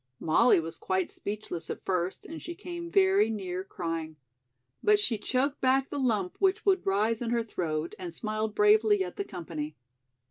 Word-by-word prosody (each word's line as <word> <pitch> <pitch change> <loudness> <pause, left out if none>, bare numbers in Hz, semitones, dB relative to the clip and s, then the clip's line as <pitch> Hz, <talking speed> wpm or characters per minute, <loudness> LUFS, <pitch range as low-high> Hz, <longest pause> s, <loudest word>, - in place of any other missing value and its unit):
Molly 200 +7 +4
was 165 0 -6
quite 185 -1 -1
speechless 200 -5 -5
at - - -6
first 180 -1 -1
and 325 0 -8
she 345 +1 -6
came 345 -2 -6
very 385 - +4
near 185 -4 -3
crying. 165 -4 -4 0.7
But 420 0 +5
she 235 - +1
choked 270 +6 0
back 265 +1 +2
the 285 - -2
lump 215 -8 0
which 390 +2 +2
would 385 - +2
rise 215 +4 +1
in 235 - -2
her 235 -1 +1
throat 165 -6 -3
and 180 -2 -5
smiled 215 +3 -3
bravely 210 -1 +5
at 180 - -7
the - - -1
company. 155 -4 -6
210 Hz, 175 wpm, -29 LUFS, 180-265 Hz, 0.7 s, But